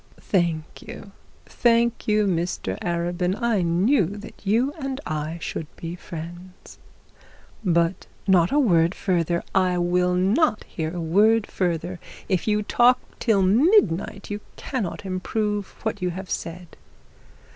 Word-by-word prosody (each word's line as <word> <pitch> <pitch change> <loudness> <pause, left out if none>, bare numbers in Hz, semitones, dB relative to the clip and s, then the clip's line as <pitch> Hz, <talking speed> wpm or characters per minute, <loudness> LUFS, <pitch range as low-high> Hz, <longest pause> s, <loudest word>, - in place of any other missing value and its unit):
'Thank 170 -5 -1
you, 200 - -10 0.3
thank 235 0 +1
you, 210 -1 +3
Mr 170 - -1
Arabin. 175 +2 -1
I 235 -5 +1
knew 180 - +3
that 205 +2 -10
you 235 +8 +1
and 270 -2 -3
I 155 +2 -3
should 160 -1 -5
be 170 +1 -6
friends.' 175 +2 -10 0.8
'But 170 -1 +1
' - - -31
'Not 180 -3 +4
a 290 - +2
word 175 - +3
further. 170 -2 0
I 185 -2 +2
will 180 +1 +2
not 215 - +2
hear 160 +1 -5
a - - -3
word 205 +7 +3
further. 175 0 -2 0.3
If 185 0 0
you 210 0 +2
talk 245 +4 +4 0.2
till 210 -5 +3
midnight, 210 - +3
you 205 - -3 0.2
cannot 210 -7 -4
improve 205 +2 -2
what 220 -3 -2
you 180 - 0
have 185 +2 -7
said.' 170 0 -5
185 Hz, 135 wpm, -24 LUFS, 170-215 Hz, 0.8 s, Not